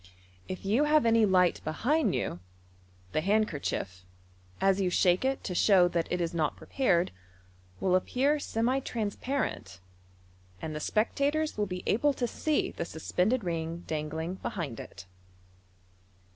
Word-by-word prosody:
If 185 +1 -6
you 230 +9 +3
have 300 -3 +4
any 225 -1 +5
light 180 -2 +3
oehind 255 - +1
you, 105 -8 -2 0.7
the 155 - 0
handkerchief, 160 - -1 0.6
as 195 0 +3
you 185 - +2
shake 180 +2 +3
it 265 0 0
to 185 - -3
show 180 -1 +5
that 170 -1 -2
it 180 - 0
is 170 0 -1
not 155 -3 0
prepared, 190 -10 +1 0.7
will 185 - +2
appear 270 +10 +1
semi 245 0 0
trans 220 -6 -3
parent, 250 - -3 0.8
and 155 +7 -5
the - - -3
spectators 280 - 0
will 210 -1 -1
be 180 -1 -5
able 285 +7 +2
to 250 - -1
see 305 +6 0
the - - -4
suspended 180 +8 0
ring 165 -1 -3
dangling 160 +3 -3
behind 155 - -4
it. - - -10
190 Hz, 145 wpm, -29 LUFS, 165-250 Hz, 0.8 s, any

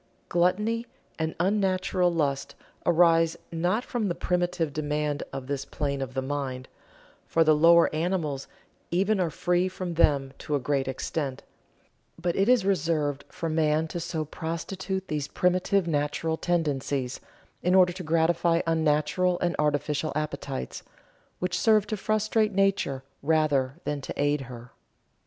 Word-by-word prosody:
Gluttony 210 +7 +1 0.3
and 160 0 -1
unnatural 185 -1 +1
lust 140 -5 -1 0.3
arise 165 -1 +4
not 175 +8 0
from 230 -4 -1
the 175 - -1
primitive 175 -4 -1
demand 150 -1 -1
of 135 -1 -5
this 140 0 -3
plane 140 -1 -3
of 130 -1 -5
the 130 - -1
mind 130 -2 -3 0.6
for 165 - +3
the 155 -1 +5
lower 170 +2 +6
animals 155 -4 -1 0.4
even 195 +4 +1
are 175 -3 +1
free 175 +3 +1
from 185 -2 -5
them 140 -4 +2
to 150 - -2
a - - +1
great 135 0 -1
extent 135 +1 -3 0.8
but 175 0 -1
it 195 +4 +2
is 250 -6 +4
reserved 155 -6 0
for 165 - -4
man 155 0 +1
to 175 - -4
so 160 -2 -3
prostitute 185 +5 -4
these 150 -2 -2
primitive 185 +3 +1
natural 150 +1 0
tendencies, 145 -6 -1 0.4
in 180 +1 +2
order 180 -1 +5
to 185 - -7
gratify 165 +1 +2
unnatural 165 +3 +2
and 175 0 0
artificial 150 0 0
appetites, 150 - -4 0.6
which 180 0 -1
serve 215 -2 +4
to 215 - -2
frustrate 215 +1 +1
nature 195 -9 +1 0.2
rather 145 -3 +2
than 145 -1 -2
to - - -7
aid 145 0 +2
her. 120 0 -10
165 Hz, 145 wpm, -27 LUFS, 145-180 Hz, 0.8 s, lower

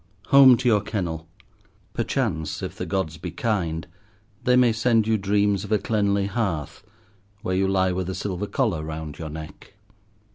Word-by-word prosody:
Home 135 -3 +8
to 125 - -2
your 105 -4 +4
kennel! 85 -7 -4 0.7
Perchance, 80 -1 -2
if - - -5
the - - -5
Gods 95 -5 -2
be 90 +4 -6
kind, 85 -4 -2 0.6
they 125 - +4
may 125 -2 +5
send 115 -1 +2
you 110 0 +2
dreams 100 -1 +1
of 105 - -8
a 105 - +4
cleanly 100 -2 0
hearth, 100 - -3 0.6
where 95 -5 -1
you 95 +1 +2
lie 95 -1 +2
with 90 0 -2
a 95 - -3
silver 100 0 -3
collar 110 - 0
round 80 -1 -6
your 80 -2 -5
neck. 80 +5 -10
95 Hz, 170 wpm, -24 LUFS, 80-110 Hz, 0.7 s, Home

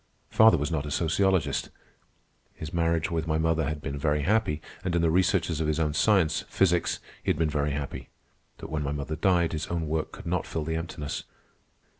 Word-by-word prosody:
Father 110 -4 +6
was 75 +3 -2
not 75 -2 -1
a - - -4
sociologist. 90 +3 +1 0.9
His 80 0 -7
marriage 85 0 +1
with 80 -1 -1
my 80 -1 +1
mother 80 0 +1
had 75 +1 -4
been 70 +1 -4
very 75 -1 +1
happy, 95 -4 +1 0.2
and 90 -2 -1
in 85 - +2
the 80 - +3
researches 85 -2 +2
of 80 - 0
his 75 +1 0
own 75 -2 +1
science, 85 -2 +3
physics, 90 -3 +2 0.2
he - - -3
had - - +2
been 80 -1 +1
very 75 0 0
happy. 70 -1 -5 0.5
But - - -9
when 75 -1 -1
mother 75 +1 -3
died, 85 -2 +2
his 80 +1 -3
own 85 -2 -2
work 80 +1 -2
could - - -11
not 90 0 -1
fill 80 - -3
the 80 +1 -2
emptiness. 80 -3 -4
80 Hz, 200 wpm, -27 LUFS, 75-85 Hz, 0.9 s, Father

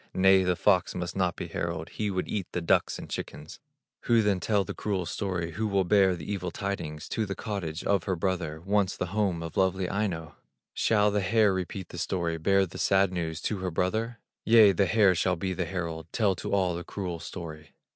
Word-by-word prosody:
Nay, 95 0 +6
the 90 -1 +1
fox 95 0 +2
must 85 -1 -4
not 90 -3 +1
be - - -5
herald, 85 -1 -4
He 105 -1 -2
would 95 -2 -2
eat 100 -4 -4
the - - 0
ducks 85 - +2
and - - -8
chickens. 75 +1 -7 0.5
Who 115 -2 +4
then 100 -3 +2
tell 100 +2 +1
the - - -6
cruel 95 -4 -2
story, 85 -1 -3
Who 110 +7 -2
will 100 -2 +2
bear 95 0 +4
the 80 - -8
evil 95 -3 -3
tidings 85 -5 -4
To 110 -2 -1
the 95 - -3
cottage 90 -7 -4
of 100 -4 +1
her 95 - 0
brother, 85 -3 -2
Once 100 +1 +1
the - - -1
home 95 -6 0
of 80 - -7
lovely 95 -1 +2
Aino? 85 -7 -3 0.4
Shall 105 -2 +3
the 105 0 +1
hare 105 0 +3
repeat 95 0 -4
the 85 - -7
story, 85 -2 -1
Bear 95 +4 +3
the 90 - -9
sad 95 -1 +3
news 80 -3 -3
to 105 - -1
her 90 0 -2
brother? 110 +8 -1 0.3
Yea, 110 -2 +7
the 95 +1 +2
hare 100 0 +5
shall 90 +1 +1
be 95 +2 -2
the 90 -1 -2
herald, 85 -3 -4
Tell 105 -4 +2
to - - -5
all 95 -3 +2
the 85 +1 -5
cruel 90 -2 -5
story. 80 -4 -8
95 Hz, 215 wpm, -28 LUFS, 85-100 Hz, 0.5 s, Yea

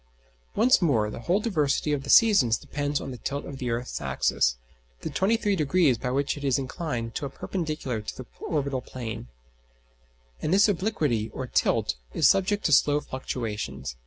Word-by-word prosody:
Once 240 +3 +4
more, 115 -11 +2
the - - -7
whole 175 - +1
diversity 155 -8 0
of 145 - -1
the 135 - -9
seasons 170 - +6
depends 145 0 -2
on - - -6
the 125 - -8
tilt 140 +5 -4
of 135 -2 -8
the 125 - -2
earth's 120 +2 -3
axis, - - +1 0.4
the - - -4
23° 185 - +2
by 125 - -1
which 140 +2 0
it 145 - -8
is 135 -1 +2
inclined 130 -4 -4
to - - -4
a 140 - -2
perpendicular 150 - -3
to 105 - -7
the 130 - -7 0.2
orbital 140 -4 -1
plane; 115 - -7 1.1
and 155 - -1
this 200 +3 +6
obliquity 160 - 0
or 130 - -3
tilt - - +1 0.2
is - - +5
subject 205 +2 +2
to - - +2
slow 145 +1 +5
fluctuations. 105 - -5
140 Hz, 170 wpm, -26 LUFS, 120-170 Hz, 1.1 s, seasons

